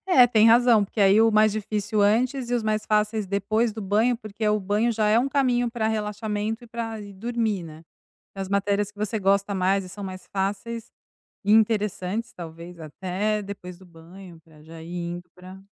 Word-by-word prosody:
É, 260 -10 +7
tem 225 -2 +4
razão, 235 -2 +5
porque 210 - -5
aí 200 +2 +6
o 225 0 +5
mais 215 0 +4
difícil 210 0 -2
antes 240 +4 +1
e 245 - +1
os 235 - 0
mais 215 0 -1
fáceis 210 0 0
depois 215 +4 0
do 220 - -7
banho, 215 +5 +2
porque 215 -1 -5
o 210 0 +1
banho 210 +5 +1
já 215 -1 0
é 220 +2 +4
um 265 +3 +1
caminho 245 -4 +1
pra 220 -2 -1
relaxamento 215 +1 -3
e - - -13
pra 225 -1 -5
ir 205 -1 -10
dormir, 220 -2 -2
né. 160 0 -11 0.5
As 195 -1 -5
matérias 200 0 0
que 205 - -23
você 215 +1 -2
gosta 200 +1 +1
mais 190 +1 +1
e - - -10
são 195 +3 -9
mais 185 -1 -7
fáceis 205 +4 -3 0.5
e 205 - +3
interessantes, 215 -1 +1
talvez 170 +1 -10
até 190 +7 -2
depois 180 -3 -9
do 190 - -16
banho, 170 +1 -14
pra 155 -2 -19
já 160 +1 -11
ir 165 - -10
indo 175 +1 -5
pra 185 +1 -12
210 Hz, 200 wpm, -24 LUFS, 190-225 Hz, 0.5 s, É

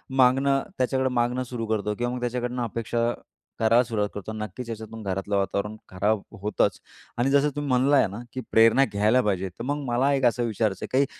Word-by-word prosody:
मागणं 135 +2 +4 0.2
त्याच्याकडं 130 +1 +1
मागणं 125 +1 0
सुरू 120 -2 -5
करतो 105 -1 -1
किंवा 120 +2 -2
मग 125 - -4
त्याच्याकडनं 125 0 -2
अपेक्षा 115 +1 -1 0.5
करायला 115 +2 +4
सुरुवात 105 -3 -1
करतो. 105 +2 -6
नक्कीच 110 +3 -6
याच्यातून 110 0 -7
घरातलं 95 +1 -2
वातावरण 100 +2 -1
खराब 100 +3 0 0.2
होतंच 105 +1 0 0.4
आणि 120 +3 +2
जसं 140 +1 +4
तुम्ही 145 0 -3
म्हणाला 130 +3 +3
आहे 135 - +4
ना 100 +4 -7
की 130 - -4
प्रेरणा 115 +5 +6
घ्यायला 110 +3 +2
पाहिजे. 95 -3 -1
तर 90 - -9
मग 145 +3 -2
मला 130 +4 +2
एक 135 -2 +1
असं 120 0 +2
विचारायचं 110 -4 -1
आहे - - -9
काही 135 +2 +3
120 Hz, 195 wpm, -25 LUFS, 105-130 Hz, 0.5 s, प्रेरणा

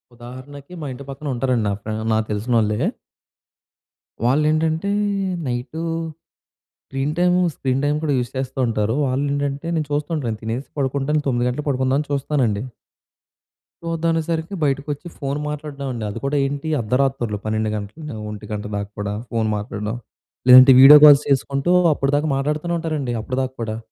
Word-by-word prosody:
ఉదాహరణకి 130 +6 -11
మా - - -5
ఇంటి 130 +2 -9
పక్కనుంటారండి. 130 -4 -1
నా 100 - 0
ఫ్రే 110 +1 -5 0.2
నాకు 110 0 +1
తెలిసినోళ్ళే. 105 0 0 1.5
వాళ్ళు 140 +5 +3
ఏంటంటే, 160 +5 0 0.6
night 125 +6 -4 1.0
screen 135 +2 -2
time, 180 0 +3 0.2
screen 130 0 -1
time 145 +1 +1
కూడా 150 -2 +1
యూజ్ 120 -1 -2
చేస్తూ 130 +1 -4
ఉంటారు. 110 0 0
వాళ్ళు 135 +2 0
ఏంటంటే, 145 +2 -2
నేను 155 -2 0
చూస్తూ 145 +2 -1
ఉంటాను, 145 -6 -3
నేను 110 -1 -4
తినేసి 115 +5 -4
పడుకుంటాను 140 +2 0
9:00 120 -2 +1
గంటలకు 145 +5 -4
పడుకుందాం 130 0 +1
అని 150 - -4
చూస్తానండి. 130 -7 0 1.2
చూద్దాం 165 0 -1
అనేసరికి 165 +2 -2
బయటకి 140 0 0
వచ్చి 145 +4 -6
ఫోన్ 140 0 -3
మాట్లాడమండి, 140 -5 -5
అది 105 - -6
కూడా 140 +2 0
ఏంటి 140 +3 -3
అర్ధరాత్రులు 125 -1 0
12:00 110 0 -1
గంటలు 110 +8 -7
1:00 105 0 -8
గంట 105 -1 -4
దాకా 100 0 -3
కూడా 100 0 -2 0.2
ఫోన్ 115 -2 0
మాట్లాడడం. 105 +1 -4 0.5
లేదంటే 130 +1 +10
వీడియో 140 +3 +11
కాల్స్ 145 -1 +8
చేసుకుంటూ 140 +3 +1 0.2
అప్పటిదాకా 145 +2 0
మాట్లాడుతూనే 150 +5 -1
ఉంటారండి 155 -7 -2
అప్పటిదాకా 130 +3 -3
కూడా. 110 -1 -3
135 Hz, 150 wpm, -21 LUFS, 120-150 Hz, 1.5 s, వీడియో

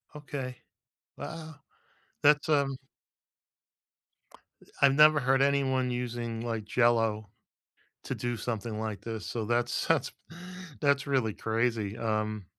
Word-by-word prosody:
Okay. 140 -4 -5 0.6
Wow. 160 -2 -7 0.7
That's, 150 +1 +4
um 140 -3 +2 1.9
Uh, - - -19 0.2
I've 140 -1 +6
never 150 0 +7
heard 135 0 +2
anyone 135 -2 +2
using, 120 -2 -3
like, 115 -2 -3
Jell-O 115 -2 +2 0.7
to - - -3
do 120 -1 -3
something 110 -2 -4
like 110 -2 -4
this, 110 -2 -5
so 115 -2 -3
that's 120 +2 0
that's - - +2 0.7
that's 140 -1 +2
really 130 -6 +1
crazy, 115 -2 -1
um 110 -2 -2
120 Hz, 115 wpm, -29 LUFS, 110-140 Hz, 1.9 s, never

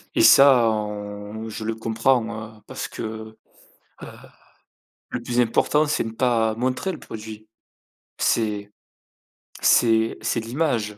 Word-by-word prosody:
Et - - +3
ça, 130 -4 +7
on 105 0 -5
je 110 - -6
le 110 +1 -2
comprends, 110 -1 -1
heu, - - -21
parce - - -5
que, 110 0 -7 0.7
heu, - - -7 1.0
le 120 - -4
plus 120 +1 0
important, 150 +6 +2
c'est 150 - 0
ne 115 - -6
pas 115 -2 +1
montrer 130 - -2
le 160 - -8
produit, 110 0 -10 0.7
c'est 105 -2 0 0.9
c'est 115 -1 +3
c'est - - -1
l'image 115 -3 -2
110 Hz, 125 wpm, -23 LUFS, 110-120 Hz, 1.0 s, ça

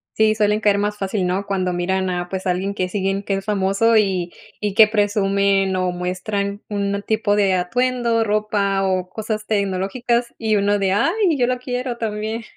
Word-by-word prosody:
Sí, 220 0 +3
suelen 210 0 +2
caer 205 -2 +3
más 205 +1 -1
fácil, 195 -1 -2
¿no? 185 +3 -1
Cuando 185 -2 -1
miran 185 +2 -1
a, 175 -1 -2
pues, 190 +1 -5
a 185 - +2
alguien 190 +3 -2
que 185 -2 -2
siguen 195 0 -1
que 195 - -1
es 195 0 -5
famoso, 205 +2 +2
y 190 -5 +1 0.3
y 205 -2 -2
que 220 +2 +8
presumen 200 -2 +1
o 185 -1 0
muestran 200 +3 -3
un 200 -1 -1
tipo 215 -2 +1
de 200 -2 +3
atuendo, 235 +5 +1
ropa 205 -2 0
o 185 -1 0
cosas 215 +1 -4
tecnológicas 215 +4 -1
y 220 -2 +1
uno 205 +1 +1
de: 195 -1 +1
"Ay, 335 - +2
yo 245 -2 +2
lo 250 0 -1
quiero 250 -1 -3
también". 220 0 -3
200 Hz, 185 wpm, -20 LUFS, 190-220 Hz, 0.3 s, que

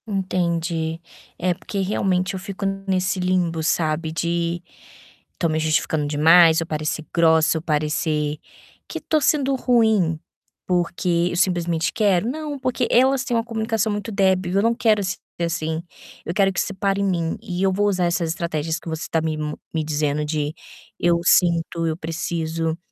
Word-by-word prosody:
Entendi! 170 -4 -1 0.4
É 180 +1 +1
porque 200 +3 -6
realmente 190 -1 0
eu 190 - -4
fico 195 +1 -6 0.2
nesse 185 0 0
limbo, 180 -3 0
sabe, 160 0 0
de 170 +2 -1 0.7
estou 170 - -1
me 155 0 0
justificando 155 -1 0
demais, 160 +3 +6
eu 165 - -4
parecer 155 0 -3
grossa, 160 -1 +4
eu - - -4
parecer 150 -1 -1 0.5
que - - -5
estou 310 -1 0
sendo 275 -1 +2
ruim. 220 -10 +2 0.5
Porque 175 -1 +1
eu - - -3
simplesmente 175 -2 +1
quero? 205 -2 +2
Não! 300 +1 -4
Porque 255 -1 -1
elas 260 +1 +4
têm 240 - -1
uma 230 - +1
comunicação 220 -1 -1
muito 205 +2 -3
débil. 190 -3 +1
Eu 195 - +3
não 230 +2 +3
quero 220 -3 +2
s 185 -2 -2 0.2
assim, 160 -1 -1 0.4
eu 170 - -3
quero 195 -1 +3
que - - -2
isso 200 - -1
pare 195 +1 0
em - - +1
mim. 170 -4 0
E 180 0 -4
eu 190 -1 +3
vou 205 +2 +1
usar 185 -3 +1
essas 170 -1 0
estratégias 160 -1 -2
que - - -14
você 160 -1 -4
está 165 - -1
me 160 -1 -2 0.4
me 160 -1 0
dizendo, 150 -1 -1
de: 150 0 -2 0.5
"Eu 170 0 +3
sinto, 170 -2 +3
Eu 160 -1 -1
preciso", 165 -1 -2
175 Hz, 170 wpm, -22 LUFS, 160-195 Hz, 0.7 s, demais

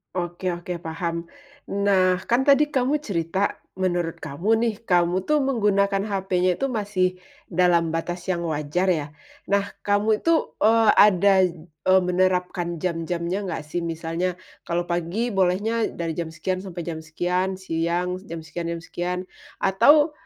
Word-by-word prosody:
Oke 175 +1 -2
oke 175 +1 -5
paham. 170 +1 -3 0.5
Nah, 190 -2 +3
kan 240 +3 +3
tadi 285 +1 +5
kamu 275 +1 +1
cerita 190 - -1 0.2
menurut 175 -3 -1
kamu 180 +10 0
nih, 230 -2 0
kamu 180 -1 +2
tuh 300 +5 +2
menggunakan 200 -6 +1
HP-nya 185 -3 0
tuh 275 - +1
masih 200 -6 0 0.3
dalam 170 -2 +2
batas 175 +3 -4
yang 175 -2 -1
wajar 155 +3 -1
ya, 155 -4 -1 0.4
nah 200 0 +2 0.2
kamu 210 +1 +1
itu, 330 -1 +1
eee, 225 0 +5
ada 200 -1 +6
j 175 - -9 0.3
e - - +5
menerapkan 180 -1 0
jam-jamnya 170 +1 -2
nggak 165 - -4
sih? 155 +3 -4
Misalnya 170 +2 -2 0.3
kalau 175 +1 0
pagi 175 +7 -2
bolehnya 205 +4 +1
dari 165 -1 -4
jam 170 - -2
sekian 185 +3 -2
sampai 185 -3 -6
jam 160 -1 -5
sekian, 180 +4 -1
siang 180 0 -2
jam 165 -1 -6
sekian 165 +2 -5
jam 170 0 -4
sekian, 180 +2 -3 0.4
atau, 290 +11 +5
180 Hz, 145 wpm, -24 LUFS, 170-200 Hz, 0.5 s, ada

